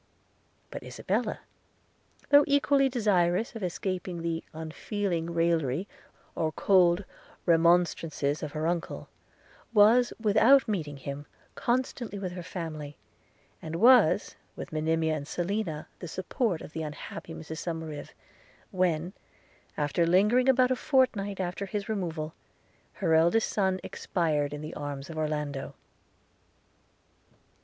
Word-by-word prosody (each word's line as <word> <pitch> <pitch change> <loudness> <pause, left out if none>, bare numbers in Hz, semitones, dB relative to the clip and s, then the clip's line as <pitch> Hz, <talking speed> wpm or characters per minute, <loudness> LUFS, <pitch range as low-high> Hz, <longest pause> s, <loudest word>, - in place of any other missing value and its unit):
But - - -6
Isabella, - - -2 0.9
though 285 0 +8
equally 280 -1 +3
desirous 205 -4 +1
of 225 - -6
escaping 180 -1 -3
the 165 -1 -2
unfeeling 170 +2 -3
raillery 165 -1 +1 0.5
or 160 -1 -1
cold 180 0 +4 0.4
remonstrances 165 -3 +2
of 150 -2 -5
her 155 0 -2
uncle, 170 0 -3 0.7
was, 230 +4 +6
without 230 +5 +5
meeting 155 -9 -3
him, 140 +1 -7 0.3
constantly 240 -3 -2
with 190 -2 -4
her 180 0 -6
family, 155 -4 -6 0.6
and 160 0 -5
was, 235 -2 +5 0.2
with - - -8
Monimia 160 0 +1
and 145 -1 -6
Selina, 175 -3 -2
the 175 - -6
support 185 - -2
of - - -10
the 160 - -3
unhappy 155 +1 -7
Mrs 160 0 -7
Somerive, 160 -4 -5 0.6
when, 180 -1 0 0.6
after 150 +3 +1
lingering 210 +9 +4
about 255 -1 +4
a - - +3
fortnight 245 -9 +1
after 185 +2 -3
his 205 +1 -4
removal, 165 -7 -3 0.6
her 160 - 0
eldest 170 +8 +3
son 190 -2 +1
expired 155 -6 -1
in 145 0 -6
the 155 +1 -6
arms 145 0 -6
of 160 - -8
Orlando. 150 -3 -3
175 Hz, 120 wpm, -28 LUFS, 155-205 Hz, 0.9 s, though